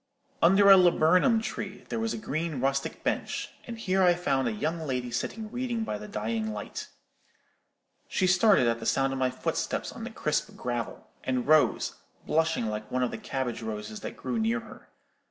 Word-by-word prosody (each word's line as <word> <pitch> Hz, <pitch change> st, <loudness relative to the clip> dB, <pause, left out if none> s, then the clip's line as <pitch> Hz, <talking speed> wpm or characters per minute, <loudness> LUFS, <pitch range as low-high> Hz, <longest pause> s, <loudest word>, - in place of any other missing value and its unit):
Under 195 Hz, +3 st, +7 dB
a 195 Hz, -, +10 dB
laburnum 180 Hz, +6 st, +4 dB
tree 205 Hz, -3 st, -5 dB
there -, -, -2 dB
was 225 Hz, 0 st, -1 dB
a -, -, -3 dB
green 160 Hz, -6 st, -3 dB
rustic 135 Hz, +1 st, -1 dB
bench; -, -, -2 dB, 0.2 s
and 235 Hz, -1 st, -6 dB
here 190 Hz, -3 st, +1 dB
I 180 Hz, -1 st, +5 dB
found 135 Hz, -7 st, 0 dB
a -, -, 0 dB
young 155 Hz, +10 st, -2 dB
lady 125 Hz, -5 st, -3 dB
sitting 215 Hz, -, -3 dB
reading 245 Hz, -2 st, -2 dB
by 105 Hz, -, -3 dB
the 105 Hz, -, -8 dB
dying 110 Hz, +1 st, -2 dB
light. 105 Hz, -1 st, -6 dB, 1.2 s
She 185 Hz, -, +1 dB
started 185 Hz, -, +5 dB
at 115 Hz, 0 st, +1 dB
the 115 Hz, -, -4 dB
sound 135 Hz, 0 st, +2 dB
of 135 Hz, -, -3 dB
my 130 Hz, -1 st, +2 dB
footsteps 130 Hz, -, -2 dB
on -, -, -8 dB
the -, -, -4 dB
crisp -, -, -2 dB
gravel, 120 Hz, -2 st, -4 dB, 0.2 s
and 130 Hz, -2 st, -1 dB
rose, 155 Hz, 0 st, +3 dB, 0.3 s
blushing 160 Hz, -4 st, +1 dB
like 105 Hz, 0 st, -4 dB
one 130 Hz, 0 st, 0 dB
of 125 Hz, -, 0 dB
the -, -, -5 dB
cabbage 130 Hz, -4 st, -3 dB
roses 110 Hz, -1 st, -5 dB
that -, -, -7 dB
grew 235 Hz, -, -2 dB
near 230 Hz, +2 st, +1 dB
her. 225 Hz, -, -14 dB
150 Hz, 190 wpm, -28 LUFS, 120-195 Hz, 1.2 s, a